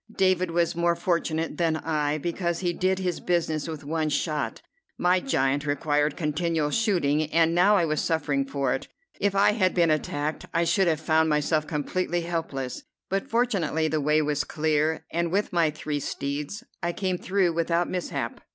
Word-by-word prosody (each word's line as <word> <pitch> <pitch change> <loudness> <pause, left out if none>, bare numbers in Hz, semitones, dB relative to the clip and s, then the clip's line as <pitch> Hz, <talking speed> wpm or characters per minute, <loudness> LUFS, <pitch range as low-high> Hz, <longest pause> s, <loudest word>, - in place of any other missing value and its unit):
David 185 -2 +2
was 170 0 +1
more 170 0 +2
fortunate 170 -2 -1
than 165 -2 +1
I, 150 -2 -1
because 170 +2 -2
he 175 -2 0
did 185 +2 +1
his 180 -2 -2
business 160 -3 0
with 160 -3 -6
one 155 +1 -1
shot: 150 0 -1 0.4
my 180 +1 +3
giant 140 - 0
required 145 0 +1
continual 155 -1 0
shooting, 155 -9 +1
and 165 0 +3
now 185 +4 +5
I 175 -4 +3
was 155 -1 0
suffering 145 -4 0
for 135 -2 0
it. 130 - -4 0.3
If 200 -1 +1
I 200 +1 +5
had 190 -4 +1
been 170 -3 +4
attacked, 150 0 -2
I 170 - +3
should 190 +2 +2
have 160 -3 +2
found 160 0 +2
myself 150 +1 +1
completely 175 +3 -1
helpless; 160 -7 -3 0.3
but 195 +1 -2
fortunately 195 -10 +1
the 155 0 0
way 150 +2 +3
was 150 -1 0
clear, 155 0 0
and 170 0 -1
with 200 +1 0
my 170 -3 +3
three 150 -1 -3
steeds 145 - -4 0.2
I 175 -1 -1
came 185 -2 -2
through 185 -3 +1
without 170 +1 +1
mishap. 180 -1 -3
165 Hz, 175 wpm, -26 LUFS, 150-175 Hz, 0.4 s, now